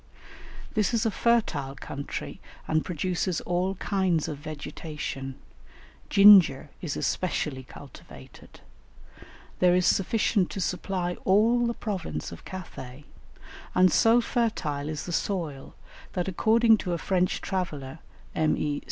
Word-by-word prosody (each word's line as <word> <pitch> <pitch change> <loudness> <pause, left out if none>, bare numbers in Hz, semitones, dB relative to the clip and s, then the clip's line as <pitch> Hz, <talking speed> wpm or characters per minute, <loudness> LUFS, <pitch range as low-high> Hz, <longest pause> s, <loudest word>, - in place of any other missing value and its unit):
This 215 +1 +1
is 230 - +1
a 225 - +2
fertile 175 - 0
country 140 +1 -6 0.3
and 155 0 +1
produces 180 +1 -2
all 180 +2 -1
kinds 185 -5 0
of 150 -3 -5
vegetation; 145 -2 -6 0.7
ginger 190 -8 +7
is 160 -6 -3
especially 150 -7 -1
cultivated; 130 +2 -14 1.0
there 180 -1 +5
is 180 -1 +2
sufficient 200 0 +2
to - - -6
supply 180 0 -2
all 230 +5 +3
the 235 - -2
province 195 -6 -4
of - - -11
Cathay, 145 -7 -9 0.7
and 185 0 +5
so 230 +1 +5
fertile 165 -13 -1
is 155 -1 -4
the 175 - -5
soil 165 -7 -3 0.4
that 180 -1 -2
according 225 +4 +4
to 180 -3 -3
a - - 0
French 180 +1 0
traveller, 160 -7 -4 0.3
M. 155 -1 +1
E. 145 -1 -1
180 Hz, 125 wpm, -27 LUFS, 150-200 Hz, 1.0 s, ginger